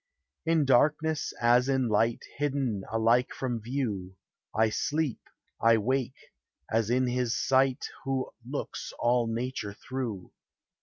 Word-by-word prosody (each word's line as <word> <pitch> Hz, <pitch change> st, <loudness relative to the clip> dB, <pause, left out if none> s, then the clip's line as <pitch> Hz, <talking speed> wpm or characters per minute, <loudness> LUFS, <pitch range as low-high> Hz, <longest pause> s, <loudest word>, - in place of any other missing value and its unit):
In 165 Hz, -3 st, +3 dB
darkness 150 Hz, +4 st, +2 dB
as 120 Hz, +2 st, +4 dB
in 130 Hz, -2 st, +2 dB
light, 115 Hz, +2 st, +1 dB
Hidden 135 Hz, -8 st, -1 dB
alike 115 Hz, +3 st, +2 dB
from 120 Hz, -4 st, -2 dB
view, 105 Hz, -7 st, -3 dB, 0.4 s
I 110 Hz, 0 st, +2 dB
sleep, 150 Hz, +3 st, -1 dB, 0.4 s
I 115 Hz, 0 st, +6 dB
wake, 130 Hz, +4 st, -2 dB, 0.4 s
as 110 Hz, -1 st, +1 dB
in 130 Hz, +1 st, +3 dB
his 125 Hz, -1 st, 0 dB
sight 135 Hz, 0 st, +2 dB, 0.2 s
Who 135 Hz, -1 st, -2 dB
looks 135 Hz, +4 st, -5 dB
all 120 Hz, 0 st, +2 dB
nature 115 Hz, -2 st, -3 dB
through. 115 Hz, -5 st, -5 dB
125 Hz, 120 wpm, -29 LUFS, 115-135 Hz, 0.4 s, I